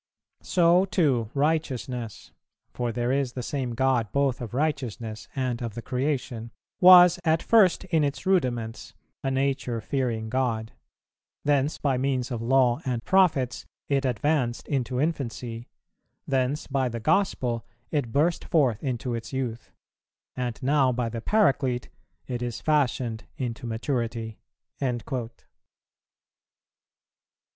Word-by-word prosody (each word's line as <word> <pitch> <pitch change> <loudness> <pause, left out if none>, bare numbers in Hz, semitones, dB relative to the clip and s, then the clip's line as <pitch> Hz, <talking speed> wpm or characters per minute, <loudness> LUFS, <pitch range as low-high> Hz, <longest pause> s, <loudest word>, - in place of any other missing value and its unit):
So 175 +1 +4
too 145 - +1
righteousness, 130 -6 -2 0.4
(for 120 -1 -2
there 120 +2 -1
is 135 -2 0
the 125 - -5
same 125 -3 -3
God 125 -4 +1
both 140 -3 +1
of 120 0 -6
righteousness 125 -7 -2
and 130 -2 -1
of 115 -3 -4
the 120 - -6
creation,) 125 -3 -2 0.3
was 180 -1 +8
at 160 -1 +2
first 210 -6 +4
in 165 -4 +1
its 140 -2 -2
rudiments, 120 -12 -1 0.3
a 135 - 0
nature 135 -3 -1
fearing 115 -2 -2
God; 115 -2 -1 0.7
thence, 145 0 +2
by 135 -3 0
means 130 -1 -1
of 120 -2 -3
Law 125 0 +3
and 120 -3 -3
Prophets, 165 -10 +2 0.2
it 140 -1 +2
advanced 130 -1 0
into 130 -3 -1
infancy; 125 -6 -3 0.6
thence, 135 +2 0
by 135 -2 0
the 115 0 -4
gospel, 120 - +1 0.3
it 140 -7 -1
burst 160 +6 +1
forth 130 -9 +2
into 125 -2 -2
its 115 -1 -5
youth; 125 -4 -4 0.6
and 125 -2 -3
now 135 -1 +3
by 120 -1 -1
the 115 0 -5
Paraclete, 135 - +1 0.4
it 125 -2 -4
is 120 -2 -3
fashioned 130 -6 0
into 120 -2 -4
maturity."[363:1] 115 +1 -4
8. - - -33
130 Hz, 125 wpm, -26 LUFS, 120-140 Hz, 0.7 s, was